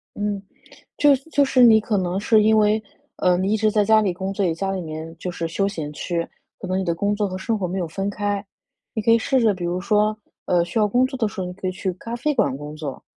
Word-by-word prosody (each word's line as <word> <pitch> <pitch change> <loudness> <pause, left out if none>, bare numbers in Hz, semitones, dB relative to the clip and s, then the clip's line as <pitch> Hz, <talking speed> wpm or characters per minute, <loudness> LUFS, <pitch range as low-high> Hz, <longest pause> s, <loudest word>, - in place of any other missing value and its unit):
嗯， 205 -1 -2 0.6
就 290 -1 +5 0.2
就 285 - +4
是 260 -2 +3
你 220 -2 +7
可 215 0 -1
能 180 0 -1
是 215 +1 +4
因 220 +1 +4
为， 215 +1 +3 0.3
呃， 180 -1 +3
你 190 +3 0
一 - - +3
直 215 0 +2
在 210 -1 +2
家 220 +1 +5
里 200 -4 0
工 190 +2 -4
作， 195 0 -1
也 165 - 0
家 195 +4 -2
里 190 -1 -2
面 160 0 -7
就 180 - -4
是 170 -1 -4
休 195 +4 0
闲 160 -7 -4
区， 170 +2 -3 0.3
可 190 - -7
能 185 +1 0
你 190 - -1
的 170 -2 0
工 200 +5 0
作 205 -1 0
和 185 - -5
生 220 +4 -2
活 190 - -1
没 185 +2 -3
有 175 -3 -2
分 195 +5 -3
开。 205 0 -2 0.5
你 220 - -2
可 230 - +2
以 230 - +6
试 260 +3 +1
着， 225 -3 +4
比 180 -1 -6
如 175 +1 -1
说， 210 +2 +2 0.3
呃， 175 -1 +2
需 175 +6 -3
要 210 - +4
工 245 +5 +2
作 265 0 -6
的 225 - +1
时 200 - -5
候， 185 - -2
你 180 - -6
可 190 0 -6
以 - - +1
去 190 0 -3
咖 230 +6 -7
啡 300 +6 0
馆 210 - +1
工 150 +2 -8
作， 150 -4 -6
195 Hz, 300 characters per minute, -22 LUFS, 180-215 Hz, 0.6 s, 你